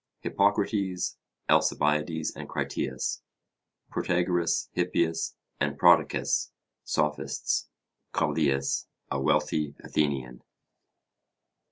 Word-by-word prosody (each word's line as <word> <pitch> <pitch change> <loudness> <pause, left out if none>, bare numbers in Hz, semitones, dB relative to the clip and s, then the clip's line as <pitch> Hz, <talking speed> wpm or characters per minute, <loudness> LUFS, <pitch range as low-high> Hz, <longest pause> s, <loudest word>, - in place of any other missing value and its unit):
Hippocrates, 100 -2 +1 0.3
Alcibiades 75 +2 +2
and - - -8
Critias. 65 -1 -2 0.7
Protagoras, 90 -1 +1
Hippias 85 -2 0 0.2
and - - 0
Prodicus - - +4 0.3
(Sophists). 75 0 -1 0.4
Callias, 70 -3 +1 0.2
a 70 - 0
wealthy 70 +1 +1
Athenian. 65 -5 -1
80 Hz, 65 wpm, -28 LUFS, 70-90 Hz, 0.7 s, Prodicus